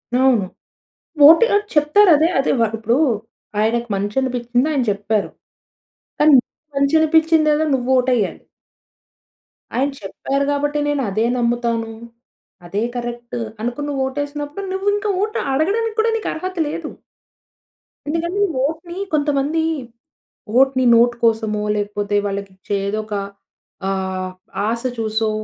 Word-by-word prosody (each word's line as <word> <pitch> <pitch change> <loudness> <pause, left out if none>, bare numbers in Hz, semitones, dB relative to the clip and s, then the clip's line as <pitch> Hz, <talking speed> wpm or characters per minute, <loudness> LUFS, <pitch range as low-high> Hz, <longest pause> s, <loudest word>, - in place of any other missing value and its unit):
అవును. 255 -5 +3 0.8
ఓటేయ్ 405 +7 +6 0.2
చెప్తారదే 310 +1 +5
అదే. 270 - +1
వ - - +2 0.2
ఇప్పుడు 230 +2 +1 0.6
ఆయనకి 235 +2 +1
మంచి 205 +1 -3
అనిపిచ్చింది 245 +1 0
ఆయన 280 -4 +1
చెప్పారు. 205 +1 -1 0.9
కానీ 305 +1 +6
నీకు 305 - -66
మంచి 280 +2 +2
అనిపిచ్చిందేదో 315 -1 +3
నువ్వు 250 -1 -3
ఓటెయ్యాలి. 245 -6 0 1.3
ఆయన 270 +3 +1
చెప్పారు 275 +8 -2
గాబట్టి 290 +1 0
నేను 290 -1 0
అదే 215 +3 0
నమ్ముతాను. 235 -1 0 0.8
అదే 200 +5 -2
కరెక్టు, 240 0 -5 0.2
అనుకుని 245 +6 -3
నువు 275 -2 -2
ఓటేసినప్పుడు 290 +6 -5
నువ్వు 385 +1 -3
ఇంకా 415 0 -2
ఓటు 430 0 -2
అడగడానికి 430 +10 0
కూడా 450 +1 +3
నీకు 440 - -4
అర్హత 370 +3 -5
లేదు. 315 +1 -4 1.2
ఎందుకంటే 340 +6 -1 0.2
ఓట్‌ని 330 +4 -5 0.2
కొంతమంది 295 +1 +1 1.0
ఓట్‌ని 265 -1 +3
నోట్ 240 +1 +4
కోసమో 220 -2 +1
లేకపోతే 205 0 -2
వాళ్ళకి 200 0 -4
ఇచ్చే 195 +2 -4
ఏదోక 215 +1 -3 0.8
ఆహ్, 190 -1 -3 0.3
ఆశ 230 +1 -1 0.2
చూసో 220 0 0
260 Hz, 115 wpm, -19 LUFS, 225-310 Hz, 1.3 s, ఓటేయ్